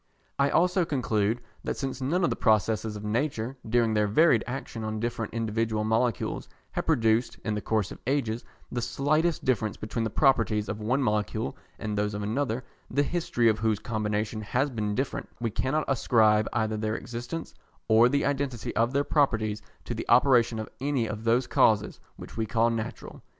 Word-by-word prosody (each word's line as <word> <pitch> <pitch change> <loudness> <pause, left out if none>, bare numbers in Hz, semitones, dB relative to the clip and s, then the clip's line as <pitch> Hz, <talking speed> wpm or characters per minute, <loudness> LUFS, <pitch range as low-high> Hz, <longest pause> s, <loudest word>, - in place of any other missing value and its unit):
I 140 0 +4
also 180 +1 +3
conclude 115 -6 0 0.2
that - - -3
since 135 -1 -4
none 170 +8 +1
of 170 - +2
the - - 0
processes 110 -1 +1
of 105 - -7
nature, 120 +2 -1
during 115 -1 +3
their 105 -1 +2
varied 120 +2 +4
action 125 -3 -5
on 110 0 -3
different 115 -1 -3
individual 110 -1 -1
molecules, 110 0 0 0.2
have - - -3
produced, 115 -6 +2
in 110 - 0
the 105 - -2
course 105 -4 0
of - - -9
ages, 120 -4 0 0.3
the 120 - -2
slightest 155 +7 0
difference 110 -5 0
between 110 +2 -3
the 110 - -1
properties 110 -5 +2
of 105 +2 -4
one 130 +6 +1
molecule 105 -3 -1 0.2
and 105 -1 -3
those 105 0 -1
of 105 - -3
another, 120 +2 -1 0.3
the 140 +3 +2
history 145 -7 0
of 110 -1 +3
whose 110 -1 +1
combinations 110 0 -2
has 135 +6 0
been 105 -3 -2
different, 130 +3 -3
we 115 -2 -1
cannot 150 +8 0
ascribe 110 -5 +3
either 110 -1 0
their 110 0 -1
existence 120 +8 -6 0.3
or 115 +2 +6
the 140 +2 +1
identity 140 -4 -2
of 115 +3 +2
their 140 +1 +2
properties 110 -9 +1 0.2
to - - -3
the - - -6
operation 120 -2 +5
of 110 - -4
any 135 -3 0
of 110 0 -5
those 120 +2 +3
causes 105 -2 +2 0.2
which - - -11
we 110 -1 -1
call 115 +2 +2
natural. 115 +1 -5
115 Hz, 180 wpm, -27 LUFS, 110-130 Hz, 0.3 s, or